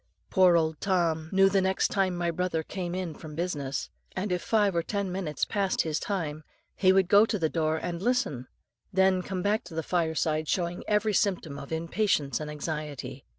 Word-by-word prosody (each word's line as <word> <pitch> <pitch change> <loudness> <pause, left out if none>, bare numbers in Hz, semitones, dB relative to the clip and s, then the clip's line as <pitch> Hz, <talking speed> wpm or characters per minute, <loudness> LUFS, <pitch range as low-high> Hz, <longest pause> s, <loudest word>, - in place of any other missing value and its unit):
"Poor 185 -3 +6
old 160 -2 0
Tom 165 -5 +1
knew 195 0 +5
the 195 0 +3 0.3
time 195 -6 0
my 175 -1 0
brother 170 -1 -1
came 180 0 -4
in 185 -3 -3
from 150 -1 -10
business, 145 -5 -3 0.2
and 190 +1 -2
if 180 -1 0
five 205 -4 +2
or 170 - +2
ten 200 +2 -2
minutes 175 -6 -2
past 195 -2 0
his 160 -1 -1
time, 155 -6 -3 0.3
he 185 -1 +4
would 190 -1 +4
go 205 +3 +7
to 220 -1 0
the 160 -4 0
door 160 -1 0
and 170 +1 -4
listen, 200 - 0 0.4
then 190 -1 +3
come 185 -1 -4
back 210 +2 +1
to 165 - -11
the 160 - -1
fireside 160 -2 0
showing 175 0 -1
every 210 0 +2
symptom 175 -9 0
of 140 - -10
impatience 160 -3 0
and 155 -1 -5
anxiety. 150 -3 -5
175 Hz, 190 wpm, -28 LUFS, 155-195 Hz, 0.4 s, go